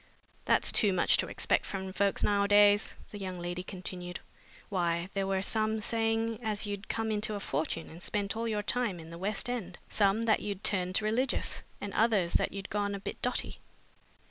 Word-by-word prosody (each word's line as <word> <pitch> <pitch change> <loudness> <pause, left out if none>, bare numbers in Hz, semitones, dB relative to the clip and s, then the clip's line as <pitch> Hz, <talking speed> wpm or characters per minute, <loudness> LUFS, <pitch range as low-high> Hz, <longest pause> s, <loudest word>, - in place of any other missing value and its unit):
"That's - - +4
too 205 -4 +4
much 180 - +4
to - - 0
expect - - +1
from 190 -1 -5
folks 200 0 +1
nowadays," 205 0 +4 0.2
the 205 - -7
young 185 -2 -4
lady 175 +1 -3
continued. 180 -1 -6 0.5
"Why, 175 -2 0
there 195 -1 -1
were 190 0 0
some 220 +1 +1
saying 225 0 0
as 215 -2 -1
you'd 205 0 -5
come 225 -1 -1
into 215 0 0
a - - -3
fortune 160 -1 -2
and 165 +2 -11
spent 200 +1 -1
all 230 +1 -2
your 210 -2 -1
time 220 -5 0
in 165 0 -10
the 170 - -8
west 200 +4 -1
end, 215 -8 -4
some 205 +2 +2
that 225 -1 +3
you'd 200 -1 -5
turned 185 +1 +1
religious, 240 +5 0 0.2
and 205 -1 -5
others 210 -6 +2
that - - +2
you'd 195 -1 -7
gone 205 -1 0
a - - -5
bit - - -6
dotty. 250 - -1
205 Hz, 190 wpm, -31 LUFS, 185-215 Hz, 0.5 s, That's